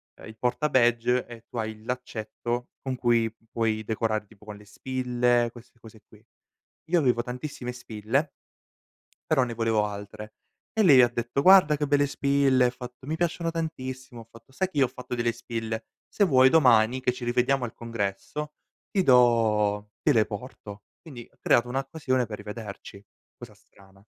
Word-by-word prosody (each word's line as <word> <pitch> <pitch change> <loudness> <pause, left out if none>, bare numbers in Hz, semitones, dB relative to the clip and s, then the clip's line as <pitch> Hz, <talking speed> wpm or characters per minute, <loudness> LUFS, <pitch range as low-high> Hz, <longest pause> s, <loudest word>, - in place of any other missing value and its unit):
uhm, - - -14
il 110 - -11
porta 125 +5 0
badge 120 0 +3
e 115 -1 -11
tu 120 - -9
hai 110 -1 -2
il 110 0 -18
laccetto 120 0 -4
con 130 -1 -3
cui 115 -2 +1 0.2
puoi 110 -1 -1
decorare 110 0 -1
tipo 105 0 -21
con 105 -1 -9
le 105 - -16
spille, 120 +1 0
queste 120 +1 -16
cose 110 -2 -15
qui. - - -20 0.7
Io 170 +1 +2
avevo 125 -4 +2
tantissime 125 0 -6
spille 125 +4 -2 1.0
però 135 -5 +4
ne 120 - -4
volevo 115 -2 +1
altre, 105 +1 -8 0.4
e 220 -2 +2
lei 140 -8 +8
ha 120 - +5
detto: 120 +3 -2
"Guarda 185 -3 +7
che 150 0 -1
belle 145 0 +2
spille!" 140 -2 +2
Ha 125 - +3
fatto: 125 +1 -10
"Mi 160 - -2
piacciono 170 0 -1
tantissimo!" 130 -7 -5
Ho 110 - -16
fatto: 115 +3 -18
"Sai 190 +7 -1
che - - -8
io 135 - +5
ho - - -3
fatto 125 0 -7
delle 120 -1 0
spille? 115 -1 -5 0.2
Se 205 - 0
vuoi 130 -7 +5
domani, 125 -5 +4
che 125 -1 +1
ci 125 0 -7
rivediamo 125 +2 +1
al 115 - -8
congresso, 115 +7 -4 0.4
ti 195 - +1
do 110 -6 +3
te 150 - +3
le 110 -3 +4
porto." 105 -2 -9 0.2
Quindi 130 -8 -11
ho - - -32
creato 120 +1 +3
un'occasione 135 0 -1
per 105 -2 -7
rivederci, 105 -1 -9 0.3
cosa - - -11
strana. 95 0 -22
120 Hz, 175 wpm, -26 LUFS, 110-130 Hz, 1.0 s, lei